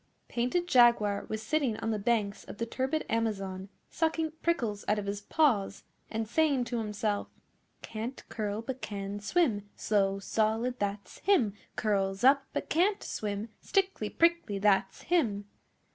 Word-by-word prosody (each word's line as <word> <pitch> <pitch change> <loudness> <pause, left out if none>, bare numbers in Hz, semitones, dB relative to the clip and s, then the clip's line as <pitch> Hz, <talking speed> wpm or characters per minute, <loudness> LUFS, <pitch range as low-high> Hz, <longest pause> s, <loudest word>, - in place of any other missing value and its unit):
Painted 250 +9 0
Jaguar 235 -7 +4
was 220 0 -3
sitting 270 -4 0
on 225 - -2
the 215 - -1
banks 205 -2 0
of - - -9
the 230 - -1
turbid 265 +6 -1
Amazon 195 -4 -2 0.2
sucking 320 -1 0
prickles 235 -12 0
out 210 - +2
of 205 - -3
his 200 0 -3
Paws 205 -6 +1 0.3
and 225 0 -2
saying 285 0 +2
to 240 -1 -2
himself 210 -1 -1 0.6
'Can't 230 +4 -6
curl, 210 0 -3
but 260 +2 -5
can 200 0 -4
swim 210 - +1
Slow 195 -2 +1
Solid, 225 +5 0
that's 200 0 -3
him! 275 - +3 0.2
Curls 195 -1 0
up, 270 +1 +5
but - - -3
can't 380 +6 +2
swim 210 +1 -3
Stickly 385 - 0
Prickly, 335 -11 +2
that's 195 -1 +2
him! 225 - +1
220 Hz, 145 wpm, -30 LUFS, 205-265 Hz, 0.6 s, up